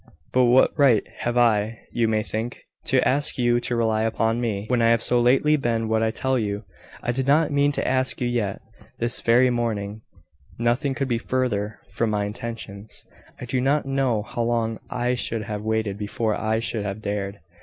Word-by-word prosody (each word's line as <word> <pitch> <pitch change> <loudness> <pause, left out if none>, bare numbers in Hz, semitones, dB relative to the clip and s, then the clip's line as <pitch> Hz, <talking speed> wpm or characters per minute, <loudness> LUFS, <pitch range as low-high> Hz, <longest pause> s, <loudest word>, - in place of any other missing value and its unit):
But 130 0 +5
what 125 +2 +5
right 125 -7 +5 0.2
have 120 0 -1
I, 115 -2 +2
you 115 -1 +1
may 110 -1 +1
think, 115 +3 -5 0.2
to 130 -1 +2
ask 145 +3 +2
you 120 -1 +3
to 120 0 -2
rely 110 -2 +1
upon 115 +1 0
me, 105 -4 -2
when 125 0 +1
I 115 - +4
have 115 0 +3
so 120 -1 +2
lately 135 +5 +4
been 115 -4 -1
what 110 0 +2
I 110 - +2
tell 130 +3 0
you. 105 -1 -2 0.4
I 120 - 0
did 130 +2 -2
not 150 +3 +4
mean 145 0 +3
to - - -1
ask 130 0 +1
you 125 - 0
yet. 115 -5 -2 0.3
This 120 0 +1
very 125 +2 +4
morning, 110 -3 -2 0.6
nothing 120 +4 0
could 135 0 -1
be 120 -2 0
further 110 -5 -1
from 115 - 0
my 105 -1 0
intentions. 105 -1 -6 0.3
I - - -6
do 125 +1 -1
not 140 +3 +1
know 135 -5 0
how 120 - -4
long 115 -1 0
I 125 0 0
should 115 -3 -2
have 105 -1 -4
waited 110 -2 -1
before 110 +1 -1
I 110 +1 0
should 115 -1 -2
have 100 +2 -5
dared. 100 -1 -3
115 Hz, 195 wpm, -24 LUFS, 110-125 Hz, 0.6 s, But